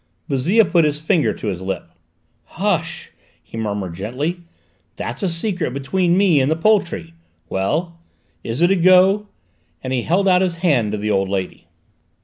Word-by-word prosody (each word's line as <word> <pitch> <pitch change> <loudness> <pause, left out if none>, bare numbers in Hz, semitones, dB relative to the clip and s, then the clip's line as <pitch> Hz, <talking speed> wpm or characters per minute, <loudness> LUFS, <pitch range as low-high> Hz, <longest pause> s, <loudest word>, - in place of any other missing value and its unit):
Bouzille 165 - +3
put 175 -3 +3
his 150 -1 0
finger 155 +1 +1
to - - -8
his 95 -4 -3
lip. 95 -1 -4 0.7
"Hush!" - - -1 0.3
he - - -13
murmured 100 -5 -3
gently; 125 - -3 0.6
"that's - - -5
a 195 - 0
secret 170 - -2
between 175 +6 +1
me 185 -8 +4
and 130 - +1
the 160 - +2
poultry. 170 -3 +1 0.4
Well, 165 - -2 0.4
is 120 +8 -2
it 175 - +4
a - - +4
go?" 185 +3 +4 0.6
and 130 0 -3
he 125 - 0
held 185 +9 +1
out 180 -1 +4
his 180 -3 0
hand 120 -10 +2
to - - -1
the 105 +1 -2
old 95 -1 +1
lady. 95 -2 -4
155 Hz, 165 wpm, -20 LUFS, 110-180 Hz, 0.7 s, me